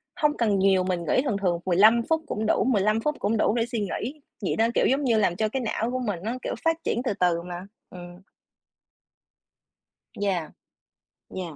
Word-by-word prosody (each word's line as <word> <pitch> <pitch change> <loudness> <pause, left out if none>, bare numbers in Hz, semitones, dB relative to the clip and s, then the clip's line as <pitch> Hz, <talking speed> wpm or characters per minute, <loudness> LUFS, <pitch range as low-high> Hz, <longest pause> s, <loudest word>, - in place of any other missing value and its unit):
hông 300 -4 +1
cần 210 -5 +1
nhiều, 190 -1 +3
mình 180 -1 -1
nghỉ 255 - +3
thường 245 -8 -1
thường 175 -3 +1
15 210 +6 +5
phút 320 0 +2
cũng 220 -4 -3
đủ, - - +2
15 215 -3 +2
phút 300 +4 -1
cũng 215 +2 0
đủ 215 - +2
để 230 - +1
suy 235 -1 -4
nghĩ, 240 +8 -4 0.2
vậy 190 - -1
đó, 225 +1 +3
kiểu, - - +3
giống 275 +3 +1
như 235 -4 +2
làm 195 -5 +2
cho 215 +2 0
cái 265 +2 -2
não 225 +1 -2
của 255 - -2
mình 205 -8 -2
nó, 225 - -2
kiểu, - - -3
phát 325 0 +3
triển 235 - -1
từ - - 0
từ 175 -2 +2
mà. 175 +1 -7 0.2
Ừm. 175 0 -11 1.9
Yeah. 190 -6 -2 0.8
Yeah. 175 -5 -6
215 Hz, 205 wpm, -25 LUFS, 185-240 Hz, 1.9 s, 15